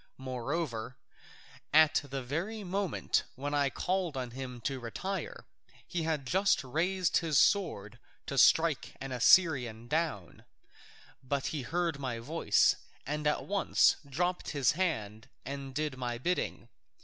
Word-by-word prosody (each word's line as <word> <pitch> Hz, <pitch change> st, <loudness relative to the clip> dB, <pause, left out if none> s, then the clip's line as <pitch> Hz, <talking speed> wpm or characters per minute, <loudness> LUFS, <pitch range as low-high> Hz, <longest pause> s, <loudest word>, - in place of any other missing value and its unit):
Moreover, 130 Hz, -1 st, -4 dB, 0.7 s
at 155 Hz, 0 st, +5 dB
the 135 Hz, -1 st, -5 dB
very 180 Hz, -, -3 dB
moment 195 Hz, 0 st, 0 dB
when 145 Hz, +2 st, -4 dB
I 140 Hz, -1 st, +2 dB
called 180 Hz, 0 st, -2 dB
on 125 Hz, -2 st, -4 dB
him 125 Hz, -1 st, -7 dB
to 135 Hz, +2 st, -2 dB
retire, 195 Hz, -, -5 dB, 0.4 s
he 175 Hz, -, -3 dB
had 160 Hz, -4 st, -1 dB
just 190 Hz, +2 st, +2 dB
raised 175 Hz, +7 st, +1 dB
his 160 Hz, -4 st, +1 dB
sword 120 Hz, -, +2 dB, 0.3 s
to 140 Hz, -, -4 dB
strike 160 Hz, +3 st, +4 dB
an 135 Hz, 0 st, -6 dB
Assyrian 125 Hz, -4 st, +4 dB
down, 150 Hz, -, -2 dB, 0.8 s
but 135 Hz, +1 st, -2 dB
he 150 Hz, -, -2 dB
heard 165 Hz, +2 st, -1 dB
my 130 Hz, -4 st, -3 dB
voice, 145 Hz, +9 st, +2 dB, 0.3 s
and 150 Hz, +1 st, -2 dB
at 150 Hz, -, 0 dB
once 200 Hz, 0 st, +3 dB
he 140 Hz, -, -20 dB
dropped 175 Hz, +6 st, -1 dB
his 140 Hz, -4 st, +2 dB
hand 110 Hz, -, -2 dB, 0.2 s
and 135 Hz, -1 st, -6 dB
did 150 Hz, -2 st, -1 dB
my 120 Hz, -1 st, -2 dB
bidding. 175 Hz, +9 st, -2 dB
145 Hz, 135 wpm, -31 LUFS, 130-170 Hz, 0.8 s, at